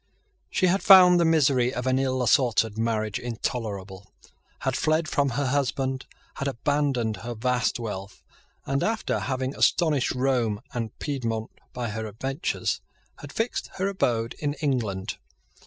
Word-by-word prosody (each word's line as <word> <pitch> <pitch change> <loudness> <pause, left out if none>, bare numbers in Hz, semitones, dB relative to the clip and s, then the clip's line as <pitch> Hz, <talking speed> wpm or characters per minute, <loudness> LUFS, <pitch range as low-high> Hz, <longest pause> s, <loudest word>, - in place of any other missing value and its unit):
She 185 - +1
had 185 +2 +2
found 180 -2 +8
the 170 - +3
misery 135 -6 +3
of 125 -1 -4
an 130 0 +2
ill 130 -1 0
assorted 115 -3 +3
marriage 110 -2 -1
intolerable, 100 -5 -5 0.5
had 130 -1 0
fled 155 +3 +1
from 140 -2 +1
her 145 - +1
husband, 135 -1 -1 0.3
had 140 - -2
abandoned 135 -4 0
her 120 +5 -6
vast 125 +2 0
wealth, 100 -4 -6 0.4
and, 135 0 0
after 225 0 0
having 130 0 -2
astonished 150 -6 +2
Rome 125 -5 +1
and 115 -3 -4
Piedmont 115 -6 -3 0.2
by 120 -2 -4
her 110 +1 -4
adventures, 135 - -2 0.4
had - - -9
fixed 225 +2 -2
her 190 +1 0
abode 120 -12 0
in 145 -1 -1
England. 115 - -2
130 Hz, 140 wpm, -26 LUFS, 115-145 Hz, 0.5 s, found